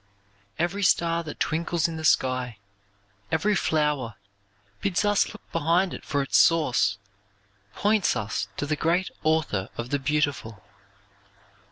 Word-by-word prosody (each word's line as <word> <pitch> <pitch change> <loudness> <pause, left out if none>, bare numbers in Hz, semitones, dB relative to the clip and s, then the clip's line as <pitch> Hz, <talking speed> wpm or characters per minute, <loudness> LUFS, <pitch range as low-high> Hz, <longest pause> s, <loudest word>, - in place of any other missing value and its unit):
Every 175 +4 -1
star 170 -2 +2
that 150 - -8
twinkles 170 0 0
in 165 - -6
the 160 - -6
sky, 130 -6 +1 0.7
every 195 +7 +2
flower, 150 - 0 0.7
bids 200 +1 0
us 205 -1 +3
look 215 - -15
behind 170 +3 +1
it - - -8
for 140 -2 -1
its 135 - +3
source, 125 - +3 0.8
points 210 -1 +2
us 105 0 -2
to - - -2
the 150 +1 0
great 170 +5 0
Author 155 -11 0
of 120 +1 -5
the 145 - +1
beautiful. 135 - -1
155 Hz, 135 wpm, -26 LUFS, 135-170 Hz, 0.8 s, us